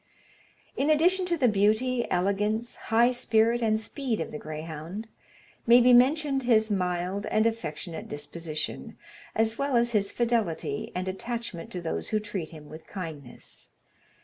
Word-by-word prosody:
In 285 - +1
addition 360 +5 +4
to 345 -1 +1
the 260 -5 +3
beauty, 220 +4 +2
elegance, 210 +5 0
high 235 +2 +3
spirit, 235 -1 +2
and 220 -1 +2
speed 240 0 -3
of - - -4
the 150 - -6
greyhound, 160 +6 -6 0.6
may 240 +1 +8
be 250 +1 +6
mentioned 275 +2 +4
his 220 -3 +3
mild 180 +1 -1
and 215 +1 +2
affectionate 170 -7 -3
disposition, 155 +7 -5 0.4
as 225 0 +1
well 280 -2 0
as 235 0 +3
his 200 -3 +1
fidelity 225 -12 -1
and 185 +1 -2
attachment 210 -2 -4
to 180 - -4
those 160 - -3
who 215 - +1
treat 205 -6 -5
him 155 -2 -12
with 155 +2 -11
kindness. 160 -9 -8
215 Hz, 150 wpm, -27 LUFS, 175-240 Hz, 0.6 s, may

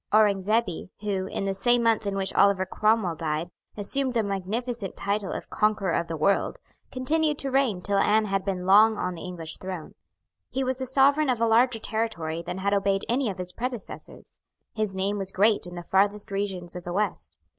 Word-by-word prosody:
Aurengzebe, 210 -2 +2
who, 195 -3 -2
in 195 - -3
the 195 - 0
same 240 +5 +2
month 225 -2 +2
in 200 - -1
which 195 -1 -1
Oliver 200 -2 +4
Cromwell 215 -2 +1
died, 160 +1 -3 0.3
assumed 255 +6 -1
the 230 -2 +1
magnificent 200 +2 -3
title 200 -1 -2
of - - -6
Conqueror 210 -3 +1
of 170 0 0
the 165 - -4
World, 195 - +1 0.3
continued 300 +3 +1
to 275 -2 -3
reign 255 -9 +1
till 200 -1 +2
Anne 215 +2 +3
had 195 -1 -1
been 185 -2 -3
long 215 +3 +6
on 180 -1 -2
the 170 - -9
English 170 -3 -6
throne. 185 -4 -7 0.6
He 265 - -1
was 260 0 -1
the 260 - -3
sovereign 275 +3 +4
of 245 -3 +1
a 230 - +3
larger 230 +2 +4
territory 215 -8 -2
than 180 +2 -5
had 200 +1 0
obeyed 195 0 +1
any 245 0 +1
of 195 - -5
his 180 0 -4
predecessors. 245 -2 -7 0.3
His 215 -3 -1
name 200 +2 -1
was 195 -1 -5
great 205 -1 +3
in 175 - -9
the 175 - -6
farthest 200 +3 +1
regions 190 -3 -3
of 180 - -6
the 175 - -5
West. 175 - -2
200 Hz, 200 wpm, -26 LUFS, 185-230 Hz, 0.6 s, long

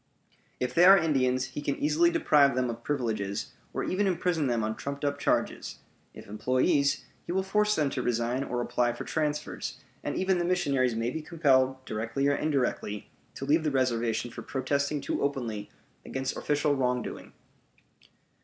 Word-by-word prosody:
If 125 -1 -2
they 175 +1 +6
are 195 +1 +10
Indians, 130 -6 +1
he - - -4
can 140 -1 -1
easily 155 +4 +3
deprive 140 -5 +4
them 125 -1 +1
of 115 0 -9
privileges, 110 -8 -2 0.2
or - - -2
even 200 +2 0
imprison 175 -4 0
them 120 -3 0
on 110 +1 -1
trumped 140 +1 -5
up 145 0 -1
charges; - - -1 0.4
if - - -10
employees, 130 +6 +1 0.2
he - - -3
will 190 +1 +1
force 210 +2 +2
them 145 -3 +1
to 130 - -2
resign 120 +2 0
or 125 -3 -2
apply 120 0 +1
for 120 - -6
transfers; 150 -2 -3 0.2
and - - -2
even 190 -1 +1
the - - +1
missionaries 140 -9 +1
may 115 +2 -1
be 160 - -4
compelled, 135 -5 +2
directly 115 +6 -1
or 145 - +3
indirectly, 130 -9 -1 0.2
to 135 - -5
leave 155 +3 +3
the 155 - +1
reservation 120 -3 0
for - - -8
protesting 140 +2 -1
too - - -2
openly 120 -7 -2 0.3
against 130 0 -3
official 145 0 +1
wrongdoing. 125 -2 -2
135 Hz, 170 wpm, -28 LUFS, 125-150 Hz, 0.4 s, are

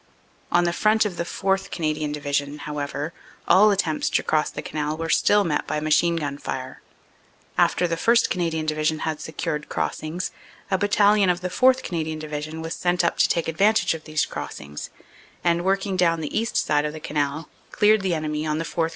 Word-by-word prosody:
"On 175 0 +4
the 170 0 +1
front 215 +4 +3
of 190 -4 -3
the - - -1
4th. 195 +2 -1
Canadian 155 -2 -2
Division, 145 0 -2
however, 150 +1 -4 0.3
all 200 +5 +6
attempts 180 -6 0
to - - +1
cross 155 -1 +1
the - - -7
Canal 150 0 -3
were 165 0 -4
still 205 0 +4
met 150 -5 -1
by - - -1
machine 155 +3 +2
gun 145 -3 -3
fire. 130 0 -6 0.7
After 180 - +3
the 165 - -1
1st. 230 +7 +3
Canadian 165 -3 -1
Division 155 0 0
had 160 -2 -3
secured 160 -1 -4
crossings, 165 +4 -3 0.4
a 190 - +3
Battalion 205 -1 +4
of 180 0 +1
the 180 - -2
4th. 260 +3 +4
Canadian 160 -2 -3
Division 155 +1 -5
was 165 +1 -4
sent 175 0 0
up 170 - 0
to - - +4
take 170 - 0
advantage 200 +7 +3
of 160 -1 -8
these 155 -1 0
crossings 75 +1 -7 0.5
and, 170 0 +2
working 195 0 0
down 165 -2 +3
the 155 - -5
east 230 +2 0
side 150 0 +2
of 150 0 -3
the 155 - -7
Canal, 150 0 -2 0.2
cleared 215 0 +4
the 185 -3 0
enemy 155 -1 -2
on 155 -1 -1
the 165 - -2
4th. 165 0 -1
165 Hz, 195 wpm, -24 LUFS, 150-185 Hz, 0.7 s, all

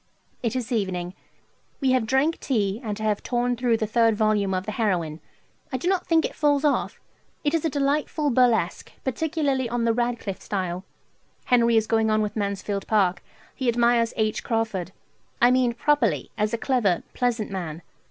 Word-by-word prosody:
It 235 0 -1
is 250 -2 -3
evening. 185 -5 -1 0.7
We 265 -2 +2
have 255 -4 +2
drank 270 +7 +2
tea, 210 -4 -1
and 210 -2 -4
I - - -4
have 210 -1 0
torn 245 0 0
through 240 -1 +1
the 220 - -1
third 225 0 +3
vol. 210 -2 +1
of 185 +1 -2
the 215 - -3
"Heroine." 175 -8 -1 0.5
I 260 - -1
do 275 - -4
not 370 -1 +1
think 325 -1 +3
it - - -4
falls 290 -1 +2
off. 290 - 0 0.4
It 295 0 +1
is 330 -1 +1
a - - +2
delightful 290 +1 0
burlesque, 235 -8 +2
particularly 275 -2 -1
on 240 0 -1
the 230 - +3
Radcliffe 235 -4 -2
style. 185 -2 -3 0.6
Henry 235 -2 +4
is 220 - +3
going 220 0 +2
on 215 0 +2
with 210 - -4
"Mansfield 200 -1 -2
Park." 190 -5 +2 0.3
He 260 -3 -1
admires 235 -1 +3
H. 215 -1 0
Crawford: 220 -6 -2 0.5
I 240 +1 +6
mean 250 -2 +3
properly, 290 -1 +1
as 210 -1 0
a 230 - -1
clever, 225 -9 +1
pleasant 240 -4 -1
man. 170 -4 -5
230 Hz, 180 wpm, -25 LUFS, 205-255 Hz, 0.7 s, I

